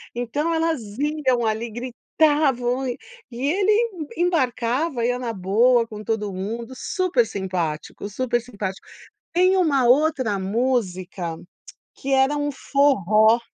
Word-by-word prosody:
Então 265 Hz, +7 st, -1 dB
elas 325 Hz, -3 st, 0 dB, 0.2 s
iam 280 Hz, -4 st, 0 dB
ali, 220 Hz, +2 st, -1 dB
gritavam 255 Hz, +1 st, 0 dB
e 245 Hz, 0 st, -3 dB, 0.3 s
e 245 Hz, +3 st, -4 dB
ele 395 Hz, +4 st, +2 dB, 0.5 s
em 345 Hz, -, +2 dB
embarcava, 260 Hz, -3 st, 0 dB
ia 245 Hz, +1 st, 0 dB
na 240 Hz, -2 st, -3 dB
boa 225 Hz, +5 st, +3 dB
com 215 Hz, -1 st, -8 dB
todo 210 Hz, -2 st, -2 dB
mundo, 225 Hz, +6 st, -5 dB
super 350 Hz, -3 st, +1 dB
simpático, 185 Hz, -2 st, -4 dB
super 240 Hz, +2 st, -1 dB
simpático. 200 Hz, -5 st, -6 dB, 0.5 s
Tem 365 Hz, +2 st, +4 dB
uma 290 Hz, -8 st, +3 dB
outra 260 Hz, -5 st, +3 dB
música, 190 Hz, -5 st, -2 dB, 0.6 s
que 270 Hz, 0 st, -3 dB
era 270 Hz, +2 st, +3 dB
um 290 Hz, 0 st, -1 dB
forró. 230 Hz, -6 st, +3 dB
245 Hz, 125 wpm, -23 LUFS, 215-290 Hz, 0.6 s, Tem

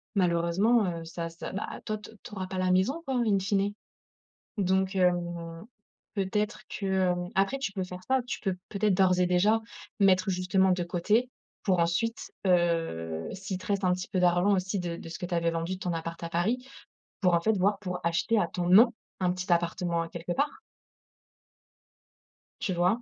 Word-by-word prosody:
malheureusement, 185 Hz, +5 st, +3 dB
heu, 170 Hz, -2 st, -3 dB
ça 165 Hz, 0 st, -5 dB
ça, 165 Hz, -, -7 dB
ben 195 Hz, -, -3 dB, 0.2 s
toi 215 Hz, 0 st, -2 dB
to 210 Hz, -, -12 dB
tu -, -, -11 dB
auras 190 Hz, -1 st, -3 dB
pas 190 Hz, 0 st, -5 dB
la 185 Hz, 0 st, +1 dB
maison 220 Hz, -, +2 dB
quoi 265 Hz, -, -1 dB
en, 245 Hz, -, +2 dB
in 200 Hz, -3 st, +3 dB
fine. 200 Hz, +1 st, 0 dB, 0.8 s
Donc 190 Hz, 0 st, +1 dB
hem, 175 Hz, 0 st, 0 dB, 0.5 s
peut-être 210 Hz, +1 st, -1 dB
que, 200 Hz, -, -4 dB, 0.2 s
hem, 175 Hz, 0 st, -2 dB
après, 195 Hz, +8 st, +2 dB
tu 200 Hz, -7 st, -3 dB
peux 190 Hz, -2 st, -2 dB
faire 180 Hz, 0 st, -8 dB
ça. 265 Hz, 0 st, +3 dB
Tu -, -, -4 dB
peux 190 Hz, -3 st, -1 dB
peut-être 205 Hz, -1 st, +2 dB
d'ores 185 Hz, -1 st, +4 dB
et 180 Hz, -, +4 dB
déjà 200 Hz, +5 st, +3 dB, 0.4 s
mettre 190 Hz, -1 st, +4 dB
justement 185 Hz, +1 st, +2 dB
de 180 Hz, -1 st, 0 dB
côté 210 Hz, +8 st, +1 dB, 0.3 s
pour 185 Hz, -3 st, +2 dB
ensuite, 185 Hz, +8 st, 0 dB, 0.2 s
heu, 165 Hz, -, +1 dB
s'il 190 Hz, -1 st, -5 dB
te 185 Hz, -, -11 dB
reste 200 Hz, -1 st, 0 dB
un 180 Hz, -, +4 dB
petit 185 Hz, 0 st, -3 dB
peu 185 Hz, -, 0 dB
d'argent 180 Hz, +3 st, +4 dB
aussi 190 Hz, +2 st, -1 dB
de 170 Hz, -1 st, -3 dB
de 165 Hz, -, -9 dB
ce 160 Hz, -, -6 dB
que 180 Hz, -, -4 dB
tu 175 Hz, -, -3 dB
avais 170 Hz, 0 st, +2 dB
vendu 165 Hz, +3 st, -3 dB
ton 180 Hz, -2 st, -2 dB
appart 165 Hz, +1 st, -5 dB
à 170 Hz, -, -3 dB
Paris 225 Hz, +10 st, 0 dB, 0.6 s
pour, 180 Hz, -2 st, +4 dB
en 170 Hz, -, +2 dB
fait, 220 Hz, -, +2 dB
voir 200 Hz, +2 st, +2 dB
pour 180 Hz, -3 st, -4 dB
acheter 175 Hz, +7 st, +2 dB
à 175 Hz, -, +1 dB
ton 175 Hz, +1 st, -3 dB
nom 230 Hz, +6 st, +8 dB, 0.3 s
un 180 Hz, -1 st, +2 dB
petit 180 Hz, 0 st, -3 dB
appartement 170 Hz, 0 st, 0 dB
a 165 Hz, -, -5 dB
quelque 170 Hz, +1 st, -6 dB
part. 285 Hz, +2 st, -1 dB, 2.0 s
Tu 200 Hz, -7 st, -1 dB
vois? 180 Hz, +7 st, +2 dB
185 Hz, 195 wpm, -28 LUFS, 175-200 Hz, 2.0 s, nom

